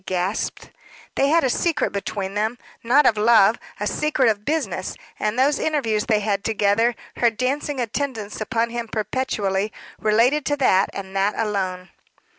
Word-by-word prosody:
she - - -37
gasped. 185 +3 -2 0.4
"They 275 - +2
had 330 +2 +4
a 260 - +2
secret 335 +3 0
between 200 -1 -4
them 215 +3 -1 0.3
not 265 +5 +4
of 220 -4 +3
love 220 -1 +5 0.2
a 210 - -2
secret 270 0 +1
of 210 -1 -1
business; 310 +6 -2 0.2
and 215 +2 -1
those 275 +3 +3
interviews 230 -9 0
they 215 -3 +2
had 200 -1 -1
together, 220 +2 +2 0.2
her 240 - +4
dancing 260 +5 -2
attendance 230 -3 -3
upon 230 +1 -1
him 235 -1 -4
perpetually, 215 -3 -1 0.3
related 235 +8 +3
to 290 - +1
that, 195 -8 +3
and 195 -1 -8
that 195 +2 +1
alone." 190 -4 -2
220 Hz, 160 wpm, -22 LUFS, 205-260 Hz, 0.4 s, love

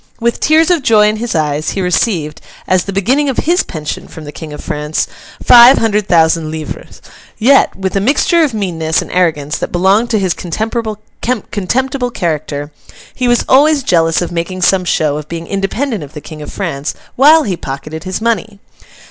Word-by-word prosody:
With 235 0 0
tears 315 +3 +3
of 345 -4 +2
joy 215 -4 +4
in 215 - -2
his 235 -2 -3
eyes, 150 -1 -1
he - - -3
received, 175 -4 -1 0.2
as 185 -1 +1
the 200 - -4
beginning 255 +10 +1
of 260 - -3
his 350 +4 +2
pension 155 -3 -6
from 160 - -11
the 145 - -8
King 155 0 -9
of 150 - -8
France, 150 +1 -2 0.4
five 245 +2 +8
hundred 210 -2 0
thousand 160 -2 +2
livres; 155 -1 -8 0.3
yet, 265 +5 +4
with 190 0 -4
a - - +3
mixture 295 - +2
of 300 - +1
meanness 170 -7 -1
and - - -11
arrogance 155 -5 0
that - - -4
belonged 195 +6 +2
to 220 - +1
his 190 -4 0
contemptible 225 +4 -3
character, 155 -7 -3 0.4
he 250 - -1
was 240 0 +2
always 285 +1 +4
jealous 165 -4 +2
of 175 - -5
making 175 +2 -3
some 185 0 +2
show 150 -3 0
of 150 0 -8
being 170 0 -5
independent 200 - -2
of 145 +1 -12
the - - -5
King 155 0 -10
of 150 - -8
France, 155 -7 -4 0.2
while 305 +4 +6
he 190 -4 -2
pocketed 150 +2 -7
his 185 0 -4
money. 220 -2 -2
190 Hz, 185 wpm, -14 LUFS, 160-235 Hz, 0.4 s, five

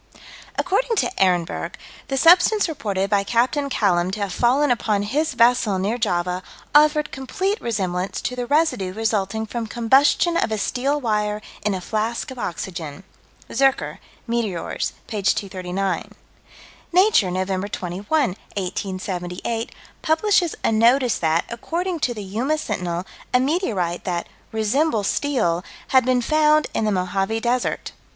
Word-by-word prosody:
According 440 +6 +1
to 380 - +1
Ehrenberg, 180 -3 +1 0.3
the 270 - -2
substance 355 +7 +5
reported 200 - -2
by 200 -1 +2
Capt. 235 +4 +2 0.2
Callam 180 -7 +2
to 210 - -3
have 200 -2 -2
fallen 260 +6 +3
upon 215 -4 +1
his 295 +10 0
vessel, 230 -4 +3
near 205 +6 -1
Java, 180 -4 0 0.3
"offered 300 0 +4
complete 380 - -2
resemblance 190 -5 -2
to 250 - -3
the 245 -1 -3
residue 290 - +1
resulting 220 -1 -1
from 230 +1 -4
combustion 270 +9 +3
of 225 - 0
a 220 - 0
steel 270 +7 0
wire 210 -4 0 0.2
in 210 -2 +1
a 185 - -4
flask 225 +7 -2
of 260 - -8
oxygen." 170 -3 -5 0.5
(Zurcher, 270 0 +1 0.3
Meteors, 230 -7 -2
p. 210 -2 -4
239.) 190 -1 -1 0.8
Nature, 365 - +4
Nov. 190 +2 -2
21, 180 +3 -5 0.5
1878, 185 +3 -3 0.3
publishes 345 +2 +2
a - - +2
notice 235 +3 +3
that, 160 0 +1
according 335 +9 -3
to 245 -5 0
the 210 - -6
Yuma 235 +11 -1
Sentinel, 180 - -3 0.3
a - - +6
meteorite 230 - -1
that 175 -2 -2 0.3
"resembles 220 +1 +1
steel" 195 -11 0 0.3
had 260 -1 +5
been 250 -1 +2
found 305 +2 +4
in 220 - 0
the 215 - +1
Mohave 195 +3 0
Desert. 245 +2 -1
225 Hz, 135 wpm, -22 LUFS, 190-275 Hz, 0.8 s, a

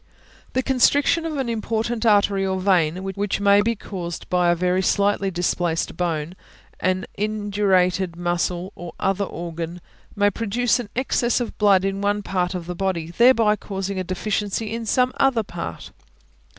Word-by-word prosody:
The 260 - +1
constriction 285 +5 +3
of 310 -2 -4
an 265 -3 -1
important 230 0 -1
artery 200 -2 +3
or 190 -1 -1
vein, 185 -2 +2
which 195 +1 -2
may 200 0 +5
be 230 +2 0
caused 175 -5 -6
by 180 -1 +3
a 175 - +4
very 180 +2 +1
slightly 200 0 +1
displaced 175 -2 -1
bone, 165 -2 -2 0.5
an 185 0 0
indurated 195 -4 +1
muscle, 175 +2 -2
or 175 -1 -8
other 195 +1 0
organ, 170 0 -6 0.4
may 205 0 +3
produce 230 +4 0
an 235 -4 -6
excess 245 -1 +1
of 240 - -4
blood 195 -3 +4
in 195 0 -2
one 205 0 0
part 185 -1 -1
of 175 -2 -5
the 180 - -4
body, 175 -3 -2
thereby 230 +1 +5
causing 195 -1 -4
a - - -1
deficiency 205 +3 -2
in 230 -1 -4
some 250 +3 +2
other 265 -5 +3
part. 80 - -7
195 Hz, 160 wpm, -22 LUFS, 180-215 Hz, 0.5 s, may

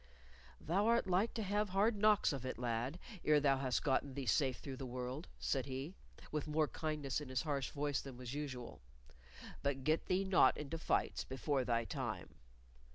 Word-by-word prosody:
"Thou 195 +7 +1
art 235 0 +4
like 190 +5 +2
to 225 - -1
have 205 +1 0
hard 205 +4 +3
knocks 210 -5 +4
of 135 -3 -4
it, 130 -3 -3
lad, 120 +5 -1 0.3
ere 150 -1 +5
thou 140 -2 +3
hast 130 -2 0
gotten 135 -1 +1
thee 140 -2 -3
safe 130 +2 +2
through 135 -2 -7
the 135 - -5
world," 125 +5 -4
said 135 -1 -1
he, 135 +6 -4 0.4
with 150 0 -2
more 155 0 +2
kindness 150 -4 -2
in 145 - -7
his 130 -2 0
harsh 140 -4 -1
voice 145 -1 -1
than 135 -3 -9
was 125 0 -6
usual. 135 -5 -5 0.8
"But 140 -1 -1
get 155 +4 +1
thee 185 +1 +2
not 185 -9 +5
into 150 +2 -4
fights - - 0
before 135 +1 -1
thy 115 -1 +1
time." 120 - -4
140 Hz, 185 wpm, -37 LUFS, 130-160 Hz, 0.8 s, ere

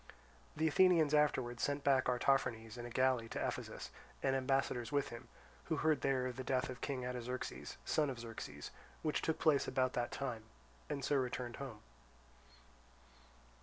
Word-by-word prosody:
The 160 +1 +3
Athenians 165 -2 +5
afterwards 130 -5 +2
sent 145 0 0
back 135 -2 +4
Artaphernes 120 -3 +1
in 120 -1 -6
a - - -7
galley 125 -2 +2
to - - -1
Ephesus, - - -5 0.3
and 135 0 +3
ambassadors 130 -2 0
with 145 -1 +1
him, 120 +1 -9 0.4
who 160 - 0
heard 155 -1 +2
there 130 -2 +2
of 125 0 -4
the 130 - -3
death 130 0 0
of 125 - -9
King 130 -3 -2
Artaxerxes, 125 0 -4
son 150 -2 +2
of 130 - -4
Xerxes, 110 -11 -7 0.3
which 155 - +1
took 160 - 0
place 150 -4 +3
about 130 -1 +1
that 120 -1 -1
time, 120 -5 -3 0.4
and 140 -3 -2
so 145 - +3
returned 125 -2 -2
home. 130 -6 -7
130 Hz, 165 wpm, -37 LUFS, 120-140 Hz, 0.4 s, Athenians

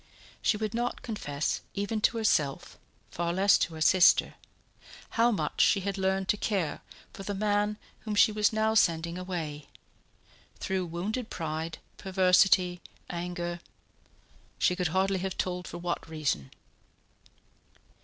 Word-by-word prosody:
She 210 - +2
would 215 0 -3
not 240 +1 -2
confess 150 -10 -2
even 205 +2 -2
to 230 - +2
herself, 150 -11 0 0.3
far 170 0 -2
less 195 +3 +4
to 165 - -1
her 160 - -8
sister, 180 +3 +5 0.8
how 230 +1 +3
much 225 - -1
she 195 - +4
had 200 +1 -2
learned 190 0 0
to 210 - +3
care 190 -8 -1 0.3
for - - -9
the 200 +1 -4
man 210 +1 0 0.2
whom 215 -2 -4
she 205 - +6
was 210 0 +2
now 220 0 +1
sending 170 -4 +2
away 160 -6 -5 0.9
through 190 -2 -2
wounded 210 +8 -3
pride, 160 0 -4 0.2
perversity, 185 -1 +3 0.3
anger... 175 0 -4 1.0
she 180 - +2
could 180 -1 0
hardly 190 +3 +1
have 190 0 -4
told 180 -1 -2
for - - -7
what 175 -1 -4
reason. 145 - -2
185 Hz, 135 wpm, -29 LUFS, 170-205 Hz, 1.0 s, she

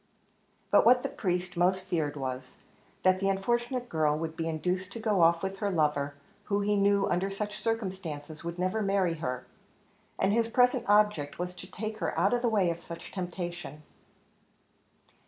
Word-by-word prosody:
But - - +6
what 250 +1 +6
the - - -1
priest 180 -1 -2
most 185 +2 +2
feared 155 -4 -1
was, 130 -1 -5 0.5
that 185 0 +4
the 195 0 +1
unfortunate 240 +5 0
girl 155 -5 +1
would 160 0 -4
be 165 0 -2
induced 180 +4 -2
to 230 - -6
go 215 -4 +1
off 165 +1 +4
with 190 0 -3
her 205 - 0
lover, 150 -5 +1 0.3
who 200 0 0
he 205 +1 +1
knew 200 0 +3
under 190 +1 0
such 210 +1 -4
circumstances 185 -9 -4
would 170 +1 -5
never 185 +5 0
marry 195 -4 +2
her; 125 -5 -3 0.7
and 195 - +2
his 230 0 +2
present 245 0 +3
object 205 -9 +3
was 180 +1 -3
to - - -10
take 215 +2 -5
her - - -2
out - - +3
of 245 - +1
the 240 - +2
way 195 -6 +2
of 170 0 -6
such 170 0 -9
temptation. 175 -5 -5
185 Hz, 175 wpm, -29 LUFS, 165-210 Hz, 0.7 s, But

